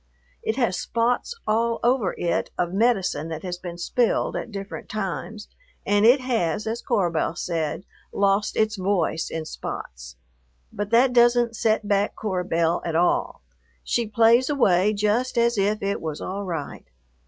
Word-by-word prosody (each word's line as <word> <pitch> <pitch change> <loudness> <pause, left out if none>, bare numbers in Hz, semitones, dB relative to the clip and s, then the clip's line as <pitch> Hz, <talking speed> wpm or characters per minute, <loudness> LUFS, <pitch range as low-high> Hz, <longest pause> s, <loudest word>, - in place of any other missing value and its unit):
It 220 - -1
has 235 -9 0
spots 240 - -1
all 230 +2 +1
over 240 -6 +2
it 170 - -1
of 175 0 -1
medicine 195 -8 +1
that 160 -1 -6
has 175 -1 -5
been 175 -1 -7
spilled 235 +7 0
at - - -4
different 195 0 -7
times, 215 +1 -4 0.4
and 205 +2 +4
it 255 +3 +6
has, 225 -6 -1
as 225 +2 -3
Cora 195 -8 +1
Belle 165 0 -1
said, 165 -1 -3 0.3
lost 200 +1 +1
its 220 0 +1
voice 185 -3 0
in 160 -1 -4
spots; 60 - -7 0.6
but 205 0 -3
that 245 +3 +4
doesn't 240 -1 +4
set 220 -1 +1
back 200 0 +1
Cora 190 -4 -2
Belle 165 -1 +1
at 165 -2 -3
all, 170 - +1 0.4
she 235 -2 0
plays 230 +4 +4
away 205 -8 +3
just 215 +5 0
as 235 0 +3
if 205 +1 0
it 200 0 -1
was 155 -2 -4
all 200 +2 -4
right. 165 -6 -6
205 Hz, 160 wpm, -24 LUFS, 175-230 Hz, 0.6 s, it